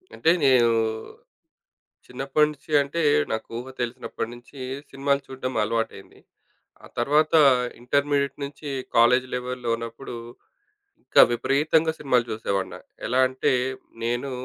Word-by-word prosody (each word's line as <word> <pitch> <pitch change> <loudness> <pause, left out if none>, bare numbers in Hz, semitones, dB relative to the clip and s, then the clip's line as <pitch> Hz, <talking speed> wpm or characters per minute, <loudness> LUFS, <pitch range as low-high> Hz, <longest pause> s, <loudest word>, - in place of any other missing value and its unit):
అంటే 165 - +3
నేను, 125 -3 +5 1.4
చిన్నప్పటి 135 +4 +1
నుంచి 150 +1 -14
అంటే, 140 +4 -4 0.3
నాకు 110 0 -3
ఊహ 125 - -7
తెలిసినప్పటి 115 -1 -4
నుంచి 120 +3 -15 0.3
సినిమాలు 140 +1 0
చూడడం 130 -1 -5
అలవాటయింది. 115 +1 -3 0.6
ఆ - - -11
తర్వాత, 150 +6 +2 0.5
ఇంటర్మీడియేట్ 140 +2 +1
నుంచి 145 +1 -8 0.3
కాలేజి 125 +2 +5
లెవెల్‌లో 125 -1 -3
ఉన్నప్పుడు, 115 +2 -7 0.9
ఇంకా - - +6
విపరీతంగా 155 +6 +2
సినిమాలు 125 -5 +1
చూసేవాడ్నా. 100 -3 -3 0.3
ఎలా 125 +2 +2
అంటే 130 +1 0 0.5
నేను 120 +4 -1
130 Hz, 110 wpm, -24 LUFS, 120-140 Hz, 1.4 s, ఇంకా